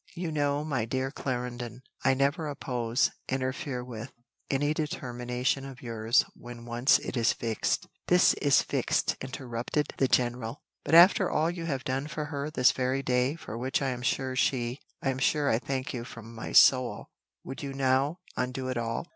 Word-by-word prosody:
"You 170 -1 -3
know, 145 -1 0
my 130 -7 -1
dear 130 +3 -2
Clarendon, 125 -2 -4 0.2
I 135 0 +4
never 140 +4 +1
oppose 125 -4 0 0.2
interfere 130 0 -2
with 120 0 -7 0.4
any 145 +2 +1
determination 125 -3 -2
of 135 -2 -10
yours 115 0 +2
when 120 -1 -10
once 120 +2 +4
it - - -6
is 115 -2 +3
fixed 115 -2 -1
" - - -45
"This 180 0 +5
is 140 -3 +4
fixed," - - 0
interrupted 130 +2 -3
the 135 - +4
general. 120 0 0 0.2
"But 160 - +2
after 180 +2 +7
all 160 +2 +1
you 170 -1 -5
have 135 -5 -2
done 135 +2 -2
for 150 0 -4
her 140 +1 -2
this 130 -5 +4
very 130 +1 -1
day, 125 +3 +1
for 115 -8 -7
which 130 +7 0
I 135 - +1
am 125 -1 -4
sure 130 +1 -1
she 125 0 0 0.2
I 135 - +1
am 130 - -4
sure 145 +1 +2
I 110 - +2
thank 130 0 -3
you 120 -2 -4
from 115 -1 -10
my 110 - -6
soul, 130 -2 +5 0.3
would 135 - -7
you 140 -1 -4
now 135 +5 +1
undo 130 +1 -2
it 130 - -2
all?" 115 +5 -2
130 Hz, 180 wpm, -29 LUFS, 120-140 Hz, 0.4 s, after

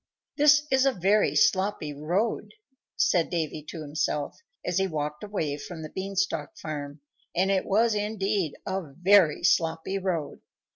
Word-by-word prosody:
"This 295 0 +5
is 265 0 +4
a 270 - +3
very 200 +2 +2
sloppy 190 -6 +2
road," 175 - -2 0.4
said 170 -3 +2
Davy 160 -3 -2
to 165 - -6
himself, 150 0 -2 0.3
as 180 +1 0
he 195 - +1
walked 150 -1 -4
away 160 -9 -2
from 160 +2 -8
the 155 - -8
Bean 195 +1 -5
stalk 170 -6 -1
farm; 145 -1 -6 0.3
and 190 +3 +2
it 190 -1 0
was, 225 +3 +3
indeed, 205 -5 -1
a 190 +1 -2
very 180 -2 +4
sloppy 165 +3 +1
road. 180 -6 -3
180 Hz, 150 wpm, -27 LUFS, 155-200 Hz, 0.4 s, This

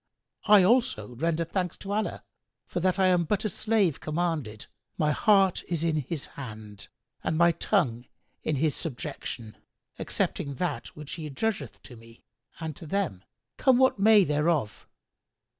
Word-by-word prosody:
I 210 -3 +7
also 180 - +2
render 165 +6 0
thanks 180 +1 -2
to 200 - -7
Allah 215 0 -2 0.4
for - - -3
that 185 +1 +1
I 190 - +3
am 180 -2 +4
but 205 +6 -1
a - - +1
slave 205 -5 +1
commanded; 155 -9 -2 0.3
my 150 -1 +2
heart 195 +3 +3
is 170 -2 -1
in 160 -2 +1
His 150 +1 -3
hand 110 -6 -9 0.4
and 160 - 0
my 170 +1 +5
tongue 150 - 0 0.3
in 155 - -1
His 150 +1 +1
subjection, 135 -7 -5 0.4
accepting 140 -1 -2
that 180 +5 -2
which 150 -2 -9
He 160 -3 -5
adjudgeth 145 - -3
to 125 - -12
me 115 0 -17 0.4
and 160 -2 -5
to 165 - -10
them, 165 - -2 0.3
come 260 -2 +4
what 260 -5 +3
may 210 0 +7
thereof. 150 - 0
165 Hz, 155 wpm, -27 LUFS, 140-190 Hz, 0.4 s, I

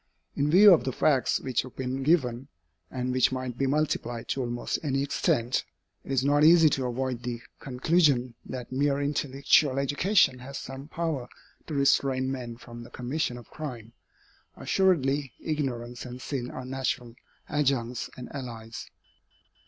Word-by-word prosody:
In 145 +1 +1
view 195 +4 +9
of 165 - +3
the 130 - -1
facts 135 +1 +2
which 130 -3 0
have 130 - -11
been 130 +1 -3
given, 135 -4 +1 0.4
and 125 0 -3
which 130 0 +3
might 130 -2 -3
be 135 +2 0
multiplied 130 -5 -1
to 135 - -1
almost 120 -1 -2
any 135 -2 0
extent, 130 -4 0 0.4
it - - -8
is 135 0 +1
not 145 +1 +4
easy 165 0 +7
to 130 -2 -1
avoid 125 0 -2
the 120 -1 -4 0.2
conclusion 135 -2 +2
that 125 -2 -7
mere 140 +1 +1
intellectual 140 -1 +2
education 140 +1 +3
has 135 +2 -7
some 135 +1 -8
power 155 -7 -3 0.4
to 155 - -4
restrain 135 -1 +2
men 120 -3 -5
from 120 -1 -11
the 120 - -11
commission 125 +1 -2
of 120 - -13
crime. 120 -7 -7 0.6
Assuredly, 145 - +1
ignorance 125 -6 -3
and 125 0 -8
sin 130 -2 -4
are 130 - -7
natural 130 -2 -3 0.3
adjuncts 130 -5 0
and 125 - -7
allies. 115 -4 -7
130 Hz, 150 wpm, -27 LUFS, 125-145 Hz, 0.6 s, view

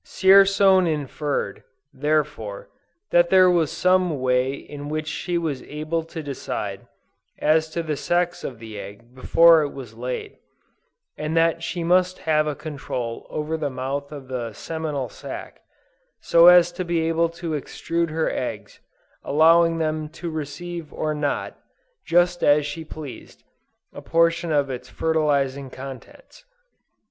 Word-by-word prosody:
Dzierzon 195 -1 +5
inferred, 145 -6 -3 0.3
therefore, 145 -7 -2 0.4
that 175 0 +4
there 185 -1 +6
was 165 -4 +2
some 180 -5 +2
way 130 0 +1
in 145 +1 -8
which 155 0 -2
she 175 +2 -2
was 155 -6 -2
able 155 +2 -3
to 160 0 -8
decide 140 -2 -5 0.5
as 160 +1 +2
to 170 +1 -3
the 155 -2 -2
sex 175 +3 -1
of 125 - -5
the 110 -2 -9
egg 100 +5 -11
before 165 +5 +5
it 145 - -1
was 130 -6 -10
laid, 125 +2 -6 0.8
and 155 +2 -2
that 165 0 +2
she 170 +1 -3
must 180 +2 +2
have 155 -1 +1
a 150 - -2
control 130 -7 -5
over 155 +1 -3
the 150 -2 -2
mouth 135 +2 -4
of 140 -3 -9
the 120 -4 -4
seminal 150 0 -4
sac, - - -9 0.6
so 170 +1 +5
as 175 -1 +7
to 185 - -4
be 170 -1 0
able 165 +1 +1
to 170 0 -6
extrude 165 +3 -2
her 160 +1 -1
eggs, 105 -5 -4 0.4
allowing 165 +2 +4
them 155 -1 -2
to 170 +1 -6
receive 160 +2 -6
or 155 -1 -2
not, 150 -1 -3 0.5
just 175 +1 +2
as 145 0 +4
she 145 +3 -5
pleased, 155 -3 -10 0.5
a - - -9
portion 170 0 +1
of 145 -2 +2
its 125 0 -7
fertilizing 140 -4 0
contents. 135 - -11
155 Hz, 145 wpm, -23 LUFS, 140-170 Hz, 0.8 s, as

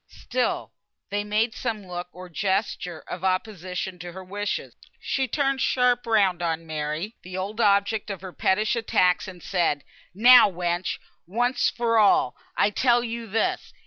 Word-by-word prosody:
Still 250 0 -2 0.4
they 205 0 0
made 215 +2 0
some 220 -5 -4
look, 175 -1 -5
or 185 +1 -10
gesture 190 -2 -2
of 180 0 -7
opposition 185 -1 -2
to 175 -1 -8
her 190 +1 -8
wishes. 205 +2 -4 0.3
She 265 -1 -1
turned 275 +1 0
sharp 250 -2 +2
round 195 -6 +3
on 165 -1 -2
Mary, 155 +6 -3
the 185 +1 -7
old 205 +5 -3
object 200 +1 +2
of 195 -3 -5
her 185 -2 -8
pettish 215 +5 +1
attacks, 185 -5 +2
and 180 -2 -10
said, 170 -6 0 0.3
"Now, 245 +2 +8
wench! 175 -1 -2 0.3
once 245 +7 +1
for 230 -1 +1
all! 200 -11 +4 0.2
I 205 - +3
tell 240 +2 +3
yo 230 -1 -5
this. 220 +2 -1
200 Hz, 155 wpm, -25 LUFS, 180-230 Hz, 0.4 s, Now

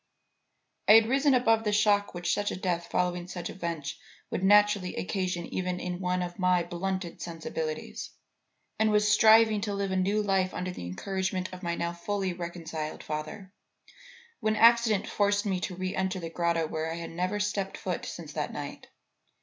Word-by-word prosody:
"I - - +9
had 225 0 +8
risen 270 +2 +3
above 225 -3 +3
the 210 - 0
shock 205 -2 +2
which 175 0 0
such 205 0 0
a - - -3
death 175 -2 -2
following 180 -1 0
such 180 -1 -5
events 170 -5 -4 0.3
would 185 - -2
naturally 205 -1 +4
occasion 180 -2 -2
even 180 -1 -2
in 180 0 -4
one 180 -1 0
of 175 +1 -7
my 180 -1 +3
blunted 175 +1 -4
sensibilities, 160 -2 -5 0.7
and 220 0 +4
was 210 0 +3
striving 220 0 +6
to 205 -1 -2
live 200 -1 -2
a - - 0
new 200 +3 +1
life 190 -2 +1
under 185 0 -3
the 90 - -7
encouragement 185 - -3
of 185 - -8
my 170 -2 -2
now 170 0 -2
fully 190 +2 -2
reconciled 165 -3 -5
father, 155 +6 -6 0.9
when 215 -1 +1
accident 230 -2 +5
forced 205 0 +1
me 190 -3 0
to 180 0 -4
re 185 +1 -3
enter 190 0 -1
the 165 -2 -6
grotto 170 -1 +1
where 160 +1 -3
I - - -3
had 170 0 -6
never 180 +5 -1
stepped 205 -2 -2
foot - - -3
since - - -7
that - - -2
night. - - -7
185 Hz, 180 wpm, -28 LUFS, 175-205 Hz, 0.9 s, I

